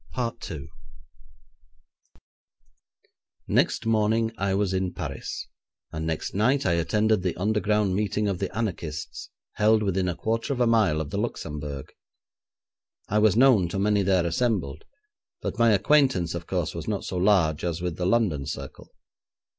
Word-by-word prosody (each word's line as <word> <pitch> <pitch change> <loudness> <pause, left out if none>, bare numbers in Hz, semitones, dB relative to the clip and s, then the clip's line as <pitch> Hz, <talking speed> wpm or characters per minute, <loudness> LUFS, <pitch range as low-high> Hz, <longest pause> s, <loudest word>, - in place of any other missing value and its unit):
Next - - +1
morning 110 0 +2
I 95 -1 0
was 100 -1 0
in 95 -1 -1
Paris, - - -5 0.4
and 80 +1 -4
next 80 -1 -3
night 125 +8 +2
I 90 - +3
attended 105 +5 +2
the 90 -2 -1
underground 105 0 +1
meeting 105 +1 0
of 95 -3 -2
the 95 - -2
anarchists, 85 -9 -4 0.3
held 110 +1 +4
within 95 -2 0
a 85 - -2
quarter 115 - -1
of 130 - -5
a 120 - +4
mile 110 -9 +3
of 75 -2 -6
the 100 - -2
Luxembourg. 75 - -5 1.2
I 105 - +2
was 105 -2 +4
known 120 -8 +5
to 95 - -4
many 105 +1 +2
there 95 -2 +2
assembled, 85 - -1 0.5
but - - -5
my 115 0 +5
acquaintance 105 - +3
of 85 -1 -6
course 90 -4 -2
was 85 -2 -6
not 105 -2 -2
so 90 - -4
large 90 -5 +2
as 85 -1 -2
with 90 -2 -3
the 90 - -1
London 95 -11 +1
circle. - - -7
100 Hz, 145 wpm, -26 LUFS, 85-110 Hz, 1.2 s, known